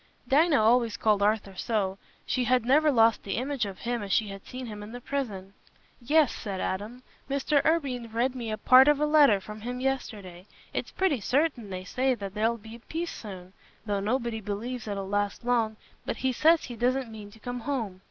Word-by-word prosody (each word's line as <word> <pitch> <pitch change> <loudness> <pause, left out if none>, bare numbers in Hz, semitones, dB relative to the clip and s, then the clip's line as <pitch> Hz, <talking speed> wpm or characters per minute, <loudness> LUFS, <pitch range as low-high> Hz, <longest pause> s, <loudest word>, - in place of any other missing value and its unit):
Dinah 295 +3 +4
always 230 -1 +3
called 210 -2 +2
Arthur 205 -1 +1
so; 195 -2 -1 0.3
she 250 -1 0
had 250 -1 +2
never 300 +5 +4
lost 225 -3 +4
the 195 - -4
image 260 -2 -1
of 195 -1 -8
him 240 -1 -3
as 200 -1 -5
she 215 0 +2
had 195 0 -8
seen 255 0 -6
him 210 -3 -7
in 210 +2 -9
the 245 - -6
prison. 215 -8 -4 0.5
"Yes," 295 +3 +3
said 195 -3 -5
Adam. 215 +8 -4 0.3
"Mr. 280 +1 +1
Irwine 270 -8 0
read 240 +3 0
me 230 -4 -3
part 255 +4 +7
of 295 -1 +4
a 300 - +2
letter 295 -9 +5
from 210 +2 -10
him 245 +2 -4
yesterday. 210 -9 -4 0.3
It's - - -3
pretty 370 -9 +1
certain, 255 -1 0
they 185 -1 -5
say, 255 +7 0
that 200 -4 -7
there'll 225 +2 +1
be 225 +1 -11
a - - -20
peace 330 +8 -4
soon, 190 -3 -9 0.3
though 205 -2 -1
nobody 230 +2 -1
believes 220 +4 -4
it'll 200 -2 -3
last 205 +3 -1
long; 230 -3 +1 0.3
but - - -3
he 260 - 0
says 320 +5 +4
he 245 - -7
doesn't 250 +1 0
mean 210 -2 -9
to 205 - -16
come 245 +2 -5
home. 225 -7 -3
235 Hz, 200 wpm, -28 LUFS, 205-260 Hz, 0.5 s, part